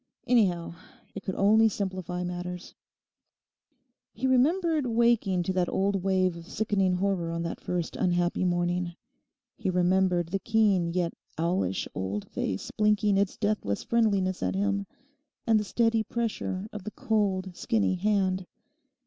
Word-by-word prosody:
Anyhow, 185 -9 +2 0.4
it 200 - -6
could 190 - -4
only 220 +3 +5
simplify 185 -3 -3
matters. 180 0 -5 1.4
He 245 - -4
remembered 305 +3 +2
waking 225 -6 +2
to 185 - -1
that 180 -1 +1
old 195 0 0
wave 185 -2 +1
of 170 0 -10
sickening 195 -3 +1
horror 185 -2 0
on 170 0 -3
the 170 - -2
first 175 -2 -3
unhappy 175 -1 +1
morning; 175 -1 0 0.6
he - - -2
remembered 180 -1 +2
the 195 +2 -1
keen 200 -6 +2
yet 175 -1 -1 0.2
owlish 165 - 0
old 95 +2 -3
face 95 - -3
blinking 210 -1 +2
its 200 -1 0
deathless 205 - -1
friendliness 200 -5 +1
at - - -1
him, 200 0 0 0.6
and 225 -2 +4
the - - -1
steady 225 +2 +1
pressure 220 -4 -3
of 210 -2 -6
the 215 - -4
cold, 195 -5 -1
skinny 220 -2 +1
hand. 190 -1 0
190 Hz, 140 wpm, -28 LUFS, 180-210 Hz, 1.4 s, only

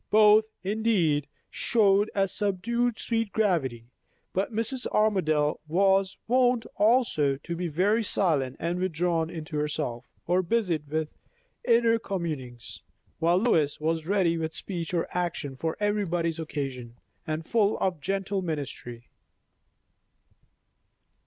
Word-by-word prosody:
Both, 215 0 +6 0.2
indeed, 190 -8 +1 0.2
showed 205 -2 +3
a 195 -1 +2
subdued 220 +5 -1
sweet 225 -3 -1
gravity; 160 - 0 0.5
but 195 +4 -1
Mrs. 230 +4 -1
Armadale 155 -9 +1
was 195 +3 +2
wont 245 -1 +3
also 205 - +3
to 170 +5 -6
be 175 +1 -2
very 195 +8 +2
silent 150 - +1
and 170 +2 -2
withdrawn 170 -2 0
into 160 -2 -6
herself, 145 -5 -3 0.2
or 180 +2 +2
busied 175 -6 -1
with 155 0 -1 0.5
inner 230 -1 +3
communings; 150 - -5 0.4
while 170 +2 +3
Lois 165 -9 +2
was 160 +1 -1
ready 180 -4 +2
with 160 0 -3
speech 175 -4 -4
or 170 -2 0
action 170 -6 -2
for 160 +5 -3
everybody's 175 -6 0
occasions, 135 -7 -5 0.3
and 155 +1 -3
full 215 0 +2
of 180 -5 -1
gentle 195 +1 -1
ministry. 135 -8 -5
175 Hz, 120 wpm, -27 LUFS, 155-210 Hz, 0.5 s, Both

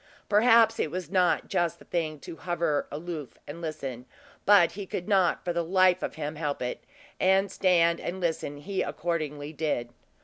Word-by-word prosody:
Perhaps 225 +1 +5
it - - 0
was 175 0 -5
not 180 -2 +2
just 170 -2 0
the - - -17
thing 155 -3 -2
to 165 - -9
hover 170 -4 -1
aloof 155 -2 -6
and 165 +4 -8
listen; 135 -6 -5 0.4
but 195 -5 +6
he 200 0 -7
could 180 - -4
not 190 -4 +2
for 175 - 0
the 170 0 0
life 185 +1 +3
of - - -4
him 150 0 -4
help 150 -3 -2
it; 125 0 -4 0.4
and 190 +1 +3
stand 170 -3 +3
and 185 +2 -4
listen 160 -4 -2
he 190 +7 -3
accordingly 155 -3 -3
did. 145 -7 -2
170 Hz, 175 wpm, -28 LUFS, 150-185 Hz, 0.4 s, but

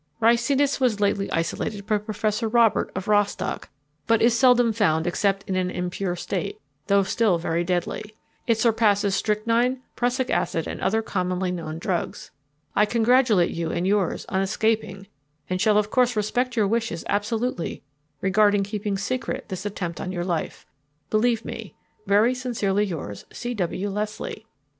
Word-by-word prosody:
Ricinus 245 +5 +3
was 245 -6 +2
lately 200 -1 +1
isolated 200 +5 -2
by 210 0 +1
Professor 215 +1 -1
Robert, 230 -1 +3
of 190 0 -4
Rostock, 205 -2 0 0.4
but 230 0 +4
is 235 0 +4
seldom 245 -2 +5
found 165 -7 +2
except 195 +2 0
in 190 - -1
an 185 -1 0
impure 180 0 -3
state, 180 0 -4 0.3
though 200 0 +4
still 195 -1 +2
very 165 0 -1
deadly. 180 +4 -2 0.3
It 230 -2 +3
surpasses 215 -3 +3
strychnine, 230 +5 +1
prussic 250 +1 0
acid, 165 - 0
and - - -6
other 220 +2 +1
commonly 185 -2 -1
known 160 -3 -5
drugs. 175 +1 -3 0.4
I 210 - +4
congratulate 230 -5 +3
you 165 -1 -3
and 170 +2 -1
yours 195 -2 +1
on 190 - 0
escaping 200 -1 -1 0.5
and 185 0 0
shall 210 0 +4
of 210 0 +1
course 250 -2 +3
respect 245 +4 0
your 215 -3 +3
wishes 225 -6 -1
absolutely 220 -1 -2 0.4
regarding 205 +1 +3
keeping 205 0 -3
secret 240 +2 -3
this 190 +1 -4
attempt 175 -4 -4
on 185 - -4
your 175 -1 -3
life. 175 -3 -3 0.5
Believe 230 +1 +2
me, - - -7 0.3
"Very 215 +5 +4
sincerely 215 -6 0
yours, 155 - -6
"C. 245 0 -4
W. 195 -1 -2
LESLIE." 210 +2 -4
210 Hz, 150 wpm, -24 LUFS, 185-230 Hz, 0.5 s, seldom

